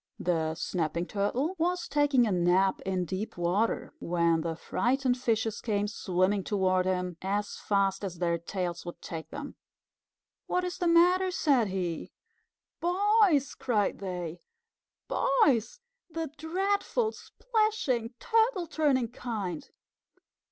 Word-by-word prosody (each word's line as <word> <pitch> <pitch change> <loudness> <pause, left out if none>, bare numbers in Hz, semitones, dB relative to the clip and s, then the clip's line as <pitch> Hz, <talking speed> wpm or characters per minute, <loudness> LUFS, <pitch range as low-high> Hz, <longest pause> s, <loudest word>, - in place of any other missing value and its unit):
The 160 -2 0
Snapping 170 0 -2
Turtle 235 - -1
was 355 +2 0
taking 290 -4 +3
a 215 - 0
nap 180 +2 +2
in 185 -2 0
deep 190 +4 -4
water, 180 +6 0
when 170 -1 +1
the 165 0 -3
frightened 250 +8 0
fishes 225 -3 -1
came 205 -2 0
swimming 190 0 0
toward 185 -2 +1
him 180 -2 -1
as 200 +2 -2
fast 195 -1 0
as 185 -3 -4
their 170 -1 0
tails 175 0 -4
would 175 - -8
take 160 -1 -7
them. 290 0 -7 0.9
"What 360 - 0
is 360 +1 -4
the 355 - +1
matter?" 360 +3 +5
said 280 - +2
he. 180 -4 -3 0.7
"Boys!" 370 -4 +3
cried 215 -5 0
they. 180 -3 -5 0.7
"Boys! 260 - +2 0.3
The 325 -3 -4
dreadful, 395 +8 0
splashing, 430 - -1
Turtle 450 -5 +2
turning 285 -7 +1
kind." 210 -9 -5
215 Hz, 125 wpm, -29 LUFS, -, 0.9 s, matter